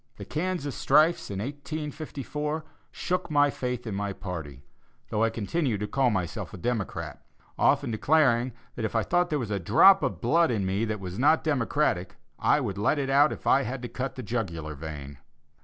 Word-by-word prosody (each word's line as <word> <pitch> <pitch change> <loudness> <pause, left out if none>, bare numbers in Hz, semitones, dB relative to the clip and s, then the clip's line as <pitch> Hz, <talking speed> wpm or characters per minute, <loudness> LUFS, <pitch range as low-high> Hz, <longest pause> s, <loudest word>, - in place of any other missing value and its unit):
The - - -8
Kansas 160 -4 -2
strifes, 160 +4 +3
in 100 - -4
1854, 150 +3 -4 0.2
shook 180 -1 -2
my 145 -1 +4
faith 125 -2 -4
in 110 - -4
my 100 0 -2
party, 80 -9 -7 0.5
though 105 - +1
I 115 - +3
continued 115 +2 -1
to 105 - -1
call 130 +3 +2
myself 95 0 -3
a - - -8
Democrat, 110 +2 -3 0.3
often - - +2
declaring 125 0 +3 0.2
that 115 - -5
if 110 - -2
I 115 - +3
thought 175 0 +1
there 150 - 0
was 120 -6 -4
a 100 - 0
drop 190 - +6
of 90 - -2
blood 165 - +3
in 105 -5 0
me 95 +4 0
that 110 -1 -3
was 95 +2 -6
not 150 +5 +4
democratic, 140 - 0 0.2
I - - +3
would 100 0 -3
let 105 +8 +2
it 135 -1 -1
out 145 +2 +5
if - - -7
I 135 - +5
had 125 0 -4
to - - -3
cut 135 +2 -4
the 130 - -6
jugular 85 -10 -3
vein. 70 -2 -8
120 Hz, 190 wpm, -27 LUFS, 100-150 Hz, 0.5 s, drop